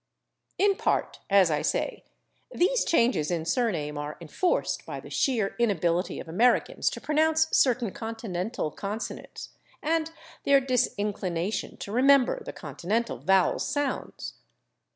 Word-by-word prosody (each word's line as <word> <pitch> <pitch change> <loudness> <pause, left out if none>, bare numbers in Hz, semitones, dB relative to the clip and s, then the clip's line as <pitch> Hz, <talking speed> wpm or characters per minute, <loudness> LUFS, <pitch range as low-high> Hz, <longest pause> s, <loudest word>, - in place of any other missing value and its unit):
In 395 0 +3
part, - - 0
as 195 -4 +5
I 150 - +1
say, - - -1 0.5
these 465 +7 +2
changes 230 - +2
in 170 -3 -1
surname 165 -8 -1
are 145 +1 -5
enforced 175 - -1
by - - -6
the - - -12
sheer 225 -7 0
inability 180 -6 +1
of - - -8
Americans 220 +10 +2
to - - -7
pronounce 315 +1 +2
certain 245 -5 +3
Continental 225 -6 -4
consonants, 205 +6 -6 0.3
and 320 +1 0 0.3
their 280 -1 +5
disinclination 205 -7 -1
to 200 - -7
remember 275 - +4
the - - -6
Continental 220 +6 -3
vowel 190 -1 +3
sounds. 290 -2 -3
225 Hz, 125 wpm, -27 LUFS, 180-275 Hz, 0.5 s, as